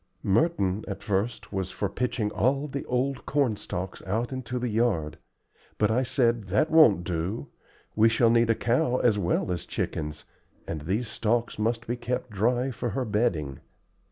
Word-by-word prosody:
Merton 105 - +1
at 100 - -6
first 105 +2 -2
was 95 -2 -2
for 100 - -2
pitching 110 0 -2
all 135 +6 +1
the 140 -1 -4
old 130 +2 -1
corn 140 -6 +2
stalks 95 -1 -5
out 115 +6 -1
into 125 -1 -4
the 125 0 -1
yard, 105 -9 0 0.6
but 105 0 +2
I 120 +3 +2
said: 120 -4 +1
"That 100 - +1
won't 120 - +6
do. 90 +4 -3 0.5
We 110 +1 +5
shall 115 0 +3
need 115 0 +4
a 115 - +4
cow 120 +2 +1
as 110 -5 +3
well 90 +1 0
as 85 -4 -2
chickens, 75 -1 -4 0.4
and 80 -2 -4
these 100 +10 -1
stalks 115 +2 -1
must 115 +2 0
be 120 +2 -2
kept 125 0 -3
dry 120 +6 +1
for 120 0 -3
her 130 - 0
bedding. 90 - 0
115 Hz, 170 wpm, -27 LUFS, 95-125 Hz, 0.6 s, won't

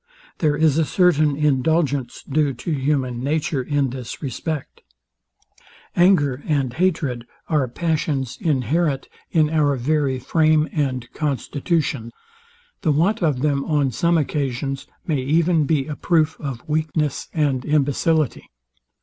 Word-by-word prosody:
There 150 -3 +2
is 155 -1 +3
a - - +4
certain 155 -3 +3
indulgence 145 -1 0
due 145 -1 0
to 125 +8 -5
human 135 -4 -1
nature 145 -1 0
in 140 -1 0
this 125 -3 -7
respect. 150 +2 -5 1.1
Anger 145 -7 +3
and 140 -5 0
hatred 145 -8 -1 0.2
are 150 -5 +2
passions 145 -2 -1
inherent 150 - 0 0.2
in 155 -2 +2
Our 150 -3 +2
very 135 +1 0
frame 155 +3 +2
and 130 -6 -1
constitutions. 145 -3 -1 0.7
The 160 - +2
want 175 +9 +2
of 150 -7 +1
them, 140 -2 +1
on 145 -4 +1
some 170 +8 +2
occasions, 135 -2 -2 0.2
may 155 -7 0
even 160 +3 +2
be 145 -3 +1
a 150 - -5
proof 160 0 +1
of 135 -6 -6
weakness 155 -1 -1
and 145 -5 +1
imbecillity. 150 0 +1
150 Hz, 125 wpm, -22 LUFS, 135-160 Hz, 1.1 s, a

